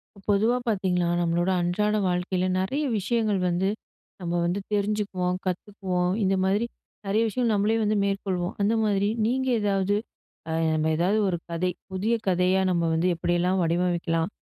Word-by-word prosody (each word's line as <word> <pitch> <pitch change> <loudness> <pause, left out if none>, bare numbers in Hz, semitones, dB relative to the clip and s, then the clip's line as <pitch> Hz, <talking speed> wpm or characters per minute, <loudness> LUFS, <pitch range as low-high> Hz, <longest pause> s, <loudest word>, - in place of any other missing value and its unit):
ப - - -19
பொதுவா 220 +5 +3
பாத்தீங்கன்னா, 185 -5 +1
நம்மளோட 175 +1 +1
அன்றாட 210 +5 +1
வாழ்க்கைல 180 +1 0
நெறைய 265 +11 -1 0.2
விஷயங்கள் 215 -1 0
வந்து, 180 +3 +1 0.5
நம்ம 175 -1 -3
வந்து 175 +3 0
தெரிஞ்சுக்குவோம், 200 -3 0
கத்துக்குவோம், 185 -1 -1
இந்த 195 0 +2
மாதிரி 200 +4 +1 0.4
நெறைய 205 +3 +2
விஷயம் 230 +2 0
நம்மளே 210 +2 +2
வந்து 210 +1 +1
மேற்கொள்வோம், 190 -2 -2
அந்த 205 +3 +2
மாதிரி 200 -1 +1 0.2
நீங்க 260 +3 0
ஏதாவது 200 -1 +1 0.5
ஆ - - -2 0.2
நம்ம 155 0 +1
ஏதாவது 180 +6 +2
ஒரு 180 -2 0
கதை 170 +2 -1 0.2
புதிய 195 +5 0
கதையா 185 +1 +3
நம்ம 170 -2 +1
வந்து 165 +3 +1
எப்படியெல்லாம் 175 +2 +1
வடிவமைக்கலாம்? 170 0 0
190 Hz, 145 wpm, -26 LUFS, 175-205 Hz, 0.5 s, பொதுவா